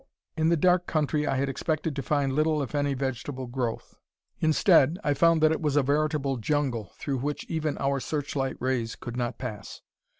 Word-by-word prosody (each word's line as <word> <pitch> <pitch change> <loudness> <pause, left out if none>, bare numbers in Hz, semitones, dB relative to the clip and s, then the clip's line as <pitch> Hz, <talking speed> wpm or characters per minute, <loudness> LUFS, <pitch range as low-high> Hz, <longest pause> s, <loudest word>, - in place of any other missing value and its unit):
In 160 -1 +2
the 170 - +3
dark 180 +2 +3
country 150 -1 0
I - - +1
had 135 +1 0
expected 155 +2 -2
to 140 - -2
find 140 0 0
little 155 0 +2
if 135 - -7
any 145 -1 0
vegetable 130 0 -3
growth. 120 -2 -4 0.5
Instead, 160 -1 +4
I 145 - +2
found 165 +2 +4
that 155 - +6
it 160 - -1
was 150 -3 0
a 145 - +4
veritable 145 -1 0
jungle 120 - -1
through 135 -3 -2
which 145 +3 -3
even 155 -2 -2
our 140 0 0
searchlight 140 -2 -2
rays 125 -3 -1
could 120 -1 -7
not 120 -1 -2
pass. 110 -5 -7
145 Hz, 190 wpm, -27 LUFS, 130-155 Hz, 0.5 s, that